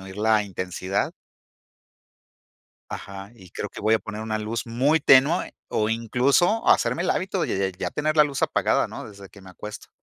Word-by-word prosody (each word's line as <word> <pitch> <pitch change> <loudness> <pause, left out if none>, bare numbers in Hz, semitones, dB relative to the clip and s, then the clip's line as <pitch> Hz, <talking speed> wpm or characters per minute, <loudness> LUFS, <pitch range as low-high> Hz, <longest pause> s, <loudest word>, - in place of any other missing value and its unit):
la 110 0 +2
intensidad. 95 0 -3 1.8
Ajá. 100 +1 -8
Y 95 -5 -15
creo 105 - -5
que - - -10
voy 110 +1 +3
a 110 - +3
poner 110 0 -7
una 110 -1 -2
luz 110 +2 -3
muy 135 +7 +2
tenue, 140 +5 +5 0.2
o 105 0 0
incluso 130 - +2
hacerme 170 - +3
el - - -1
hábito, 190 0 -1
de - - -1
ya 90 - -21
ya - - -2
tener 155 +1 -1
la 150 - +8
luz 140 -2 -3
apagada, - - +1
¿no?, - - -8
desde 100 -1 -13
que 100 - -16
me 95 - -13
acuesto. 105 +3 -9
110 Hz, 180 wpm, -24 LUFS, 100-140 Hz, 1.8 s, la